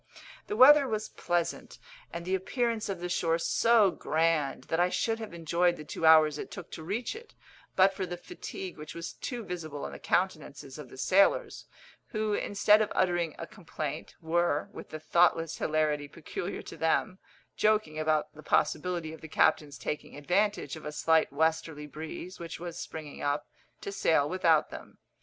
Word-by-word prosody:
The 420 - -3
weather 285 -1 +8
was 215 -2 -2
pleasant, 175 -1 -2 0.3
and 170 - -6
the 185 - -2
appearance 230 +4 -1
of 190 -3 -4
the 180 - -2
shore 165 -2 +1
so 220 +3 +4
grand 155 -6 0
that 165 - -2
I 180 +1 +4
should 225 +4 0
have 220 -2 -6
enjoyed 170 +1 +1
the 155 - -9
two 160 +2 -1
hours 155 -2 +6
it - - -6
took 185 -4 -9
to - - -7
reach 205 - -3
it, 460 0 -12 0.4
but 190 +1 +5
for 190 -1 -3
the 175 0 -5
fatigue 180 +1 -8
which 150 - -8
was 170 0 -6
too 245 -3 -5
visible 160 -7 -5
in - - -5
the - - -9
countenances 155 -6 -2
of 140 -4 -9
the - - -13
sailors, 190 +9 +2 0.4
who, 215 -3 -1
instead 205 +1 +3
of 215 - -1
uttering 175 -4 +1
a 165 - -5
complaint, 155 -6 -6
were, 165 -2 +1
with - - -9
the 155 - -6
thoughtless 165 0 +2
hilarity 150 -2 0
peculiar 165 +3 -6
to - - -10
them, 185 +4 0 0.4
joking 210 -8 +1
about 155 -1 0
the 155 - -12
possibility 170 +1 0
of 160 - -11
the 160 - -8
captain's 150 -2 +2
taking 150 -1 -5
advantage 180 0 0
of 160 - -10
a 150 - -5
slight 160 +1 +2
westerly 160 0 0
breeze, 160 +5 -8
which 170 -1 -7
was 170 -1 -6
springing 155 -2 -7
up, 145 0 -1 0.3
to 200 - -5
sail 160 -6 +2
without 165 -3 +2
them. - - -10
170 Hz, 180 wpm, -29 LUFS, 155-190 Hz, 0.4 s, weather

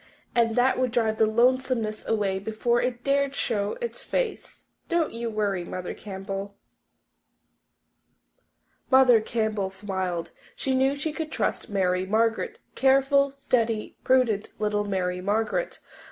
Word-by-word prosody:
And 230 -2 +2
that 250 +2 +3
would 255 -2 +1
drive 225 -2 +1
the 220 - +5
lonesomeness 235 -1 +1
away 200 -3 0
before 220 +4 0
it 245 -1 -2
dared 280 0 +1
to - - -7
show 205 - -1
its 485 +1 -5
face. - - -3 0.2
Don't 340 -2 +1
you 230 0 -3
worry, 205 -4 -1
Mother 180 +1 -5
Campbell." 195 0 -6 2.3
Mother 260 -4 +6
Campbell 220 -3 -1
smiled. 190 -3 -3 0.2
She 265 - -1
knew 265 +2 +2
she 295 +2 -3
could 315 -1 -4
trust - - -1
Mary 185 -2 0
Margaret 225 +2 +1 0.2
careful, 275 +1 +3
steady, 230 -5 0
prudent 240 -5 +2
little 210 -1 0
Mary 180 -2 -1
Margaret. 220 - -1
225 Hz, 130 wpm, -26 LUFS, 200-260 Hz, 2.3 s, Mother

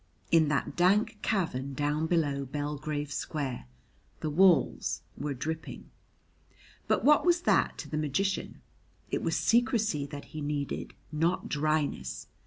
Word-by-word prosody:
In 160 -2 +5
that 145 -3 -1
dank 205 +5 +3
cavern 140 - -1
down 150 +3 0
below 145 -5 +1
Belgrave 145 +1 -3
Square 135 - -3 0.5
the 155 - -2
walls 175 -2 +3
were 145 -1 -3
dripping. 160 +5 -5 1.0
But - - +1
what 300 +1 +6
was 350 -1 +3
that - - +2
to - - -6
the 155 - -3
magician? 190 +7 -1 0.5
It - - 0
was - - 0
secrecy 225 - +2
that 145 0 -8
he 155 - -5
needed, 145 -1 -3 0.2
not 165 +4 0
dryness. 150 - -1
150 Hz, 130 wpm, -29 LUFS, 145-180 Hz, 1.0 s, what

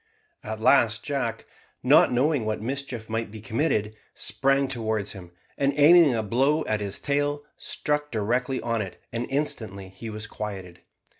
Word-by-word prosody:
At 110 0 -5
last 110 -2 +4
Jack, 125 -6 -2 0.4
not - - +6
knowing 135 +1 +2
what 110 0 -2
mischief 130 -1 -5
might 115 0 -2
be 110 +1 -9
committed, 110 -2 -1 0.2
sprang 135 0 +2
towards 110 -5 -2
him, 90 -4 -10 0.3
and 140 0 +2
aiming 150 -2 +7
a 110 - -1
blow 135 +9 +1
at 110 -1 0
his 100 -1 -2
tail, 145 0 0
struck 150 0 -2
directly 125 +4 -1
on 115 -1 0
it, 95 -3 -7
and 120 +1 -2
instantly 110 -9 -3
he 95 +5 -8
was 105 0 -6
quieted. 95 -5 -7
115 Hz, 155 wpm, -26 LUFS, 110-140 Hz, 0.4 s, aiming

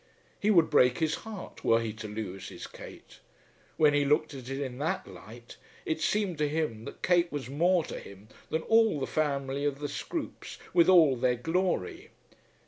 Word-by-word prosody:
He 210 - +1
would 170 -6 +4
break 125 0 +4
his 160 -2 0 0.2
heart 205 -4 -9
were 115 - +4
he 115 -2 -3
to 110 0 -8
lose 100 -3 -6
his - - -8
Kate. - - -12 0.6
When 150 -2 +5
he 145 0 +3
looked 150 +2 +1
at 130 -2 -8
it 135 0 -3
in 130 -2 -5
that 155 +3 -1
light 105 +6 -12 0.3
it 160 0 -2
seemed 195 -4 0
to 150 -1 +1
him 145 -8 -2
that - - -10
Kate 175 -1 +3
was 135 -3 -5
more 175 +4 +3
to - - -6
him 100 +1 -13 0.2
than 160 0 -1
all 225 -8 +3
the 135 - -1
family 140 -2 -1
of 145 -1 0
the 145 0 -4
Scroopes - - -6 0.2
with 170 0 +5
all 160 -7 +6
their 125 0 +1
glory. 165 - -2
145 Hz, 190 wpm, -29 LUFS, 120-165 Hz, 0.6 s, all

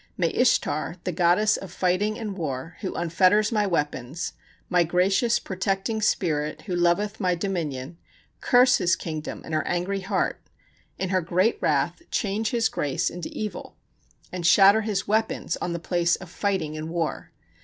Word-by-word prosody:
May 170 -3 +1
Ishtar, 175 - +1
the 180 - -2
goddess 180 +5 +3
of 195 - -9
fighting 185 +4 0
and 215 -4 -5
war, 155 -2 -4
who 190 - -3
unfetters 185 +6 +3
my 210 -2 +1
weapons, 150 -2 -2 0.3
my 180 -2 +3
gracious 190 +7 +2
protecting 195 +3 -2
spirit, 155 -7 0
who 185 -4 -3
loveth 190 +5 +1
my 180 -4 +1
dominion, 165 -5 -4 0.4
curse 250 0 +5
his 175 0 +3
kingdom 155 -2 -6
in 160 - -7
her 155 - +2
angry 180 +3 -1
heart; 195 0 -1 0.6
in 190 - -2
her 185 -1 +2
great 185 +6 +1
wrath, 150 +3 +1
change 215 +2 -1
his 235 -2 +2
grace 140 -3 -1
into 175 -2 -6
evil, 215 -1 -6 0.6
and 175 -2 -1
shatter 200 +4 +7
his 205 -3 -2
weapons 220 -4 0
on 175 - -3
the 170 - -2
place 175 0 +1
of 180 -3 -11
fighting 190 -7 -1
and 155 +1 -5
war. 165 -2 -3
180 Hz, 160 wpm, -25 LUFS, 165-205 Hz, 0.6 s, shatter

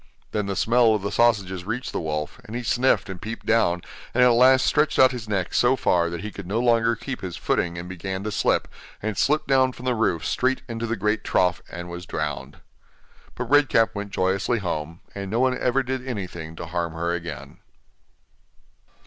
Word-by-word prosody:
Then 105 -2 -1
the 100 - -2
smell 115 +2 +4
of 105 - -3
the 100 - -2
sausages 100 -6 +2
reached 115 +6 -4
the - - -3
wolf, 75 +7 -4
and 115 -1 -9
he 120 - -3
sniffed 125 +2 +2
and 95 -3 -7
peeped 115 +2 -6
down, 90 -6 +2 0.3
and 125 - +5
at 125 - +7
last 130 +2 +5
stretched 150 0 +2
out 130 -1 +7
his 120 -4 -7
neck 95 -4 -1
so 125 +2 +4
far 85 -8 +2
that 85 -1 -5
he 105 +1 -5
could 100 -4 -9
no 105 +5 0
longer 115 -1 +3
keep 125 +3 -6
his 90 -3 -5
footing 85 -1 -1
and 85 +1 -6
began 95 +1 -5
to 105 - -3
slip, - - +1 0.4
and 110 -1 -2
slipped 150 +9 +2
down 130 -1 +3
from 125 - -11
the 125 - +2
roof 100 -9 0
straight 130 +1 0
into 115 -1 -4
the 115 - -1
great 105 +1 0
trough, 90 -1 +1
and 85 0 -7
was 90 0 -8
drowned. 75 -2 -4 0.7
But - - -5
Red 145 -1 +5
Cap 115 -1 +3
went 100 -1 -5
joyously 95 +5 0
home, 85 -4 -4
and 100 -1 -5
no 115 +4 0
one 130 0 +3
ever 130 +2 +1
did 130 0 -3
anything 90 -8 -5
to 85 - -6
harm 85 0 -3
her 85 +1 -1
again. 85 -3 -6
105 Hz, 210 wpm, -24 LUFS, 90-120 Hz, 0.7 s, at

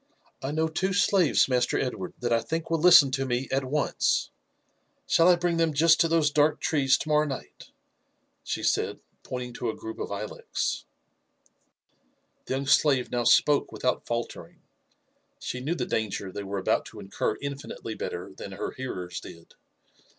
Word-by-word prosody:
I 135 - -3
know 160 +2 0
two 190 +4 -1
slaves. 185 -4 +3
Master 125 -2 +1
Edward, 110 -8 -3
that 120 -1 0
I 115 - +4
think 165 +4 -4
will 165 - +2
listen 155 -5 +7
to 135 0 -1
me 125 +1 -1
at 135 +1 +1
once; 140 +2 0 0.7
shall 165 - +4
I 180 - +7
bring 175 -1 -1
them 165 -2 +1
just 160 +2 +5
to 165 - +4
those 160 -3 +2
dark 150 +1 +3
trees 135 -3 +2
to - - -6
morrow 150 0 +3
night?" 135 -2 -8 0.7
she - - -4
said, - - 0 0.2
pointing 125 -1 -6
to 120 0 -3
a - - -3
group 110 0 -8
of - - -4
ilex. 100 +1 -3 1.6
The - - -1
young 135 +1 -3
slave 135 -2 +3
now 120 -1 -1
jspoke 145 +4 +4
without 125 -1 -2
faltering; 120 0 -5 0.8
she 125 - -5
knew 150 +7 -2
the - - -2
danger 100 -3 -2
they 100 - -5
were 100 0 -4
about 95 - 0
to - - -11
incur 100 +2 -2
infinitely 140 -5 -6
better - - -6
than - - -8
her - - -4
hearers 90 -9 -6
did. 85 0 -13
135 Hz, 170 wpm, -27 LUFS, 120-155 Hz, 1.6 s, listen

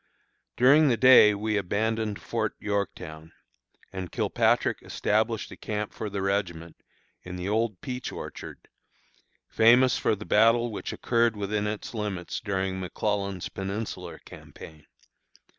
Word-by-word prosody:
During 140 +5 +6
the 120 -4 +2
day 125 -5 +7
we 105 +1 -1
abandoned 105 +2 -1
Fort 110 -2 -3
Yorktown, 80 -6 -4 0.6
and 95 -3 -6
Kilpatrick - - +1
established 110 +1 -1
a - - -8
camp 105 -1 -4
for 110 - -5
the 100 -1 -3
regiment 85 -4 -2 0.5
in 90 0 -8
the 90 +1 -5
old 110 -2 -1
peach 125 0 -5
orchard, - - -9 0.8
famous 120 +3 +4
for - - +1
the 105 +1 -9
battle 115 +2 +3
which 105 - -5
occurred 115 -2 +1
within 105 +1 -2
its 105 +2 -5
limits 105 -5 -4
during 95 -2 -2
McClellan's 100 0 -2
Peninsular 100 +3 -5
Campaign. 80 -2 -13
105 Hz, 125 wpm, -27 LUFS, 95-115 Hz, 0.8 s, day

